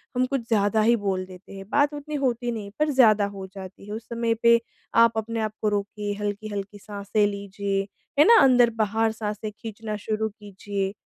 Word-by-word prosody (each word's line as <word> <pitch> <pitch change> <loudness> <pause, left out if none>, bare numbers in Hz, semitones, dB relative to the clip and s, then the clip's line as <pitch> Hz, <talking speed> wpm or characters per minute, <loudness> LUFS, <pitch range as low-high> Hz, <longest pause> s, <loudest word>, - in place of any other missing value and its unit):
हम 250 +1 +2
कुछ 270 0 -1
ज़्यादा 215 -1 +2
ही 235 +2 +4
बोल 190 -2 0
देते 185 +1 -13
हैं 195 0 -8
बात 285 +3 +2
उतनी 295 +1 -6
होती 240 -1 0
नहीं 225 -3 -4
है 200 - -10
पर 305 0 +2
ज़्यादा 220 -7 +5
हो 195 -1 -6
जाती 190 0 -10
है 210 - -6
उस 220 +1 -5
समय 235 -1 0
पे 235 0 +6 0.4
आप 230 -1 +2
अपने 225 +1 -2
आप 215 -1 -1
को 215 - +2
रोकिए, 205 0 -3
हल्की-हल्की 205 -1 -4
साँसे 205 +1 -1
लीजिए, 200 -1 -2 0.4
है 300 - +8
ना? 465 0 +8
अंदर-बाहर 225 -4 +3
साँसे 210 0 -4
खींचना 215 0 -6
शुरू 220 0 0
कीजिए। 200 -1 -5
215 Hz, 190 wpm, -25 LUFS, 200-235 Hz, 0.4 s, है